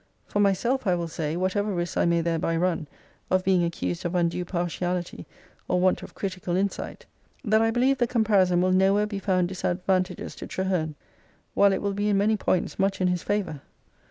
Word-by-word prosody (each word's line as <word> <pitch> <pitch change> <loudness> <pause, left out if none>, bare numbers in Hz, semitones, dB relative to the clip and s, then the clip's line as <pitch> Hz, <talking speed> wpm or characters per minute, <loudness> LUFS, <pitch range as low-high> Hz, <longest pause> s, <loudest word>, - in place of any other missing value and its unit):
For 205 - -2
myself 220 +6 +1
I 180 - +3
will 170 -1 -2
say, 160 -1 -3
whatever 195 +3 0
risks 175 -2 -2
I - - +2
may 170 0 +2
thereby 165 0 0
run 165 -3 0 0.4
of 185 0 +2
being 185 -2 +3
accused 90 - -3
of 175 +1 -2
undue 175 0 +1
partiality, 175 0 -3 0.4
or 180 - +1
want 185 0 +2
of - - -11
critical 185 -2 -3
insight, 195 +1 -3 0.4
that 220 0 +3
I 225 - +3
believe 255 +3 +2
the 240 - +2
compari 215 -5 +3
son 175 0 +2
will 185 0 +2
nowhere 195 +3 +3
be 205 -2 -4
found 185 -2 +1
disadvantageous 185 0 -1
to - - -7
Traheme, 180 -5 -1 0.6
while 200 0 +5
it 195 - -1
will 200 -1 0
be 205 +1 0
in 200 - +3
many 210 +2 +3
points 185 -3 -1
much 195 0 +1
in 185 -1 +2
his 180 -1 -1
favour. 195 -9 -2
185 Hz, 195 wpm, -26 LUFS, 175-200 Hz, 0.6 s, while